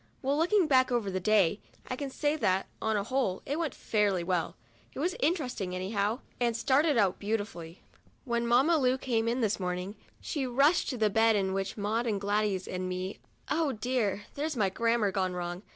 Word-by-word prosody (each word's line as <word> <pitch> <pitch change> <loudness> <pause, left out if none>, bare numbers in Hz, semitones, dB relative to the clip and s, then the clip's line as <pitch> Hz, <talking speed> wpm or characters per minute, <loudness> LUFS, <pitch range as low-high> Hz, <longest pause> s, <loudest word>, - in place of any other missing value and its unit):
Well, 275 +2 +1
looking 360 +5 +3
back 260 -4 +3
over 230 -5 0
the 185 - -1
day, 205 -1 +3 0.3
I 255 - -3
can 280 +1 -4
say 290 +2 0
that, 190 -10 +1 0.2
on 220 0 0
the 205 - 0
whole, 230 -5 -1
it 290 +4 -2
went 320 -6 -2
off - - -19
fairly 205 -5 +1
well. 175 -2 -1 0.4
It - - -6
was 350 +5 0
interesting 255 - -1
anyhow, 200 +5 -1 0.2
and 235 -2 +1
started 285 +3 +3
out 195 -4 +2
beautifully. 200 -5 -4 0.4
When 235 -2 0
Mamma 270 +8 +4
Lu 255 -1 +2
came 230 -4 -1
in 240 +2 0
this 215 -3 +1
morning, 180 +1 -3 0.3
she 280 -5 -3
rushed 275 +7 +3
to 255 - -3
the 215 -2 +2
bed 225 +1 +4
in 190 -2 0
which 195 +2 -3
were 205 - -5
Maud 225 +3 0
and 210 -3 0
Gladys 205 -2 0
and 185 0 -3
me 185 +2 -4 0.3
(oh 310 -3 +1
dear! 215 -3 -1
there's 300 -1 -3
my 200 -3 +2
grammar 230 0 +1
wrong! 180 -2 -2
225 Hz, 200 wpm, -30 LUFS, 195-260 Hz, 0.4 s, Mamma